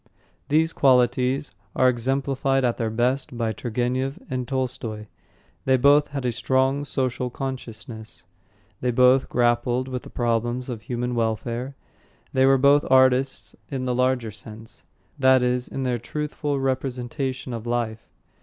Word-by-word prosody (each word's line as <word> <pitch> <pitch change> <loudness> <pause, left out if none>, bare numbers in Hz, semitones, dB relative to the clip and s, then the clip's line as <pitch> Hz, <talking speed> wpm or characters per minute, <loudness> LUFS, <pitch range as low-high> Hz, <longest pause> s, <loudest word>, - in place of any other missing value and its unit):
These 160 +2 +2
qualities 130 +1 +2 0.2
are 130 - +4
exemplified 135 +2 +1
at 120 - 0
their 115 -1 -1
best 125 +3 -1
by 115 -2 0
Turgenev 125 +4 -2
and 125 -1 -2
Tolstoy. 125 -5 -3 0.6
They 130 0 +4
both 145 +3 +5
had 140 -2 -5
a 125 - +1
strong 130 +3 +1
social 130 -2 -2
consciousness; 115 -6 -7 0.5
they 125 - -1
both 125 +2 +4
grappled 120 +1 +1
with 130 -1 -4
the - - -12
problems 120 +1 -1
of 115 -3 -5
human 125 +2 -3
welfare; 115 +3 -2 0.6
they 130 0 +4
were 135 0 +5
both 140 +2 +5
artists 130 0 +3
in 130 -3 -3
the 125 - 0
larger 125 -2 +1
sense, 110 +2 -11 0.3
that 130 -1 +5
is, 125 0 +1
in 135 - -4
their 125 -2 0
truthful 150 +3 -3
representation 130 0 -3
of 115 0 -6
life. 115 -2 -2
125 Hz, 140 wpm, -24 LUFS, 120-135 Hz, 0.6 s, both